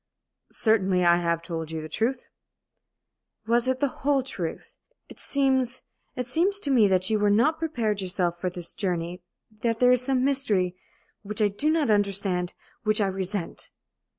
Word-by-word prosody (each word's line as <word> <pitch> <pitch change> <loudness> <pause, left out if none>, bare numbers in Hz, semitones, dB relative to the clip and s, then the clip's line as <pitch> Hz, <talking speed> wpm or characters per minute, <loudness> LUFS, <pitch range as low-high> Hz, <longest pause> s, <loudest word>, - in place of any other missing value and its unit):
"Certainly 190 -5 +2
I 170 0 +6
have 170 -1 -1
told 165 -2 -5
you 160 0 -4
the 155 - -6
truth." 240 +9 -2 1.2
"Was 235 +2 +2
it 260 0 0
the 285 - +3
whole 275 -1 +2
truth? 180 -10 -6 0.3
It - - -13
seems 260 -2 0 0.3
it 250 - -3
seems 360 +10 +1
to 285 - -1
me 230 -6 +5
that 185 +1 +2
you 215 - +2
were 205 0 +3
not 265 +10 +3
prepared 235 -11 -1
yourself 180 -2 -1
for 185 - 0
this 175 -1 -4
journey 180 -3 -3 0.4
that 230 -1 0
there 250 0 +5
is 250 -1 +5
some 260 0 +1
mystery 210 -10 +1 0.5
which 210 0 -5
I 210 -1 +3
do 245 +10 -1
not 310 -7 +2
understand 195 -3 +1 0.3
which 215 -2 +1
I 205 - +3
resent!" 190 -1 -2
210 Hz, 170 wpm, -26 LUFS, 180-255 Hz, 1.2 s, I